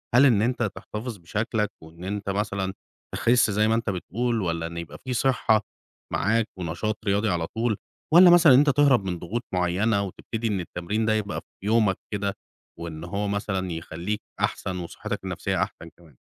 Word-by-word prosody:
هل 135 +3 +8
إن 115 -7 +5
أنت 120 +1 +1
تحتفظ 110 +1 -6
بشكلك 105 +4 -1
وإن 80 +2 -13
أنت 100 +1 -3
مثلًا 100 -1 -1 0.4
تِخِس 120 -2 +3
زي 105 +2 +3
ما 110 - +3
أنت 115 -1 -1
بتقول 115 +5 -1
والّا 85 -2 -1
إن 85 0 -8
يبقى 85 -1 -6
في 130 - -3
صِحّة 120 -4 +3 0.5
معاك 110 +3 +2
ونشاط 90 +5 -2
رياضي 100 +2 +2
على 85 -2 0
طول 115 0 -1 0.4
والّا 175 +2 +10
مثلًا 170 -5 +8
إن - - +8
أنت 145 +1 +4
تِهرَب 140 -6 +4
من 90 -2 -2
ضغوط 115 +9 -3
معيّنة 95 +4 +2
وتبتدي 110 +4 -4
إن 105 -3 0
التمرين 90 +5 -2
ده 110 - +3
يبقى 105 -2 -2
في - - -17
يومك 110 -3 +3 0.2
كده 100 -1 -1 0.5
وإن 85 -2 -6
هو 100 +4 -2
مثلًا 95 -2 -2
يخلّيك 85 +5 -4 0.2
أحسن 90 -1 -1
وصِحّتك 85 -1 -5
النفسيّة - - -1
أحسن 85 - -8
كمان؟ 80 -7 -19
105 Hz, 175 wpm, -25 LUFS, 90-115 Hz, 0.5 s, والّا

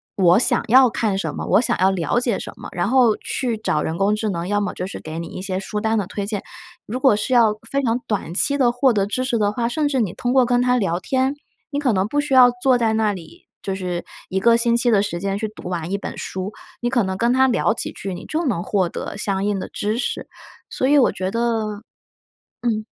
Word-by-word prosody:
我 180 -1 +5
想 - - +2
要 255 +3 +7
看 215 -4 -1
什 - - -3
么， - - -5
我 - - +4
想 - - +1
要 190 - +4
了 185 +5 0
解 240 -4 0
什 - - -7
么， - - -9
然 175 +2 -1
后 245 -4 +4
去 240 -4 -2
找 215 - -1
人 160 - -3
工 200 +3 +2
智 215 0 -2
能， 170 -2 -3
要 205 +1 +1
么 205 - -1
就 180 - -4
是 - - -7
给 155 +1 -7
你 170 - -6
一 - - -7
些 185 -1 -3
书 210 +2 -4
单 220 0 +1
的 205 - 0
推 200 0 -4
荐。 205 -2 -3 0.4
如 245 +5 -4
果 260 -5 +5
是 210 +5 -2
要 225 -3 +4 0.2
非 280 0 +1
常 240 -1 0
短 200 -6 -2
期 280 +6 +3
地 250 -4 +3
获 245 0 +2
得 200 -2 +1
知 255 +5 -1
识 245 -3 0
的 205 -1 +2
话， 235 +2 -1
甚 300 +3 0
至 270 -3 0
你 200 -6 0
通 245 0 -2
过 260 -2 +5
跟 245 0 +2
它 250 0 +2
聊 180 -6 0
天， 265 +4 0 0.4
你 285 - -1
可 265 -5 +1
能 190 +1 +1
不 290 +6 0
需 290 -2 -3
要 250 -1 +8
坐 260 -2 +4
在 225 -1 +2
那 220 -1 +1
里， 170 -4 -12 0.2
就 195 - -3
是 180 -2 -3 0.3
一 190 - 0
个 230 +3 +5
星 235 0 +2
期 240 +1 +2
的 205 -3 +4
时 175 -4 -3
间 195 +1 -2
去 220 - -2
读 210 -4 -9
完 175 0 -3
一 200 - 0
本 - - -6
书。 190 +2 -5 0.3
你 240 - 0
可 245 -3 +2
能 190 -1 -2
跟 235 +1 +2
他 265 +1 +4
聊 240 -3 +2
几 - - -3
句， 195 -2 -6
你 175 - -9
就 325 +2 -2
能 195 -9 -1
获 190 -2 0
得 - - -6
相 195 -1 -2
应 205 -1 0
的 - - -6
知 215 +3 -2
识， - - -3 0.4
所 260 - 0
以 290 - +5
我 265 - +4
觉 185 0 -3
得 225 -2 -1 0.8
嗯。 220 -3 -1
215 Hz, 280 characters per minute, -21 LUFS, 195-245 Hz, 0.8 s, 要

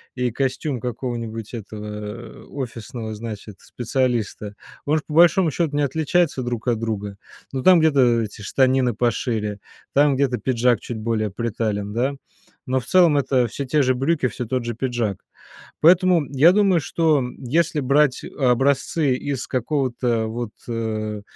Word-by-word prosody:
и 125 -1 0
костюм 135 +1 -2
какого-нибудь 115 -3 -5
этого, 105 -2 -7
э, 105 +2 -8
офисного, 115 -3 -6
значит, 105 -2 -8
специалиста, 120 -4 -2 0.3
может, 150 +1 0
по 150 - -7
большому 170 +2 +5
счету 155 -2 -1
не 145 - +2
отличаются 155 0 +1
друг 120 -1 -4
от 120 -2 +2
друга. 105 -3 -4 0.4
Но 130 -1 -3
там 185 -2 +7
где-то 135 -7 +3
эти 105 +1 -8
штанины 130 +2 +2
пошире, 110 -3 -1 0.3
там 145 0 +4
где-то 130 -2 +1
пиджак 120 0 +1
чуть 120 - -6
более 110 -1 -1
притален, 105 -2 -3
да. 130 +5 0 0.5
Но 130 0 0
в - - -14
целом 175 -5 +5
это 130 -3 +2
всё 140 +5 -5
те 150 +3 +2
же 130 0 +2
брюки, 135 +1 +1
всё 125 +1 -5
тот 125 +1 -2
же 120 -1 -3
пиджак. 120 -5 -2 0.6
Поэтому 175 -1 +5
я 145 +5 +6
думаю, 195 -4 +3
что 155 -2 +1 0.2
если 155 +4 0
брать 140 0 +2 0.2
образцы 135 +3 +2
из 135 0 -3
какого-то 125 -3 -1
вот, 115 0 -4 0.2
а, 110 -2 -3
125 Hz, 150 wpm, -22 LUFS, 115-140 Hz, 0.6 s, там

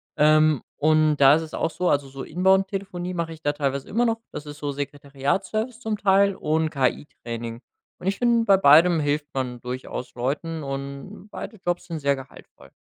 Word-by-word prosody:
Ähm, 155 -2 +4 0.2
und 155 0 +3
da 140 +1 +7
ist 165 - 0
es 160 - -9
auch 160 - -1
so, 180 - -1
also 140 -1 +1
so 135 0 -8
Inbound-Telefonie 190 0 0
mache 170 -1 -3
ich 160 - -14
da 145 - +1
teilweise 140 -2 -3
immer 240 +4 +1
noch, 225 0 0
das 150 - -7
ist 145 0 -9
so 145 -1 -3
Sekretariatsservice 145 - -3
zum 220 -2 -2
Teil 200 0 +3
und 160 -1 0
KI 140 -1 0 0.2
Training. 115 0 -5 0.4
Und 185 - -6
ich 195 - 0
finde, 235 -1 +2
bei 195 - +6
beidem 165 +1 +6
hilft 145 +1 -1
man 125 -2 -3
durchaus 125 0 -6
Leuten 150 +5 -3
und 140 +9 -7
beide 220 - -7
Jobs 175 0 -1
sind 165 -2 -4
sehr 140 -1 +2
gehaltvoll. 135 0 -14
155 Hz, 185 wpm, -24 LUFS, 140-190 Hz, 0.4 s, da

